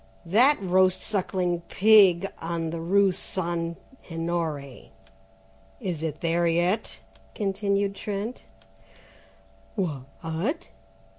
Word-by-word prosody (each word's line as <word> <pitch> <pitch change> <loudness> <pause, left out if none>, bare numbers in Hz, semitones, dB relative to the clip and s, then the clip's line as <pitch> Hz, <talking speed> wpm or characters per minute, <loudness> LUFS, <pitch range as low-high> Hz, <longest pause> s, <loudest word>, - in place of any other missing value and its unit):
"That 245 - +5
roast 185 -1 +2
sucking 180 -4 -1
pig 195 -4 +6
on 165 -1 -3
the 165 - -4
rue 195 +3 +3
St. 170 -2 -2 0.3
Honoré, 165 -5 -3 0.9
is 170 -5 -3
it 160 -2 -4
there 170 +1 +1
yet?" 175 +6 0 0.3
continued 200 -1 0
Trent. 210 +4 -4 1.4
"Wh 150 -9 -2 0.2
at?" 180 - -3
180 Hz, 90 wpm, -26 LUFS, 165-200 Hz, 1.4 s, pig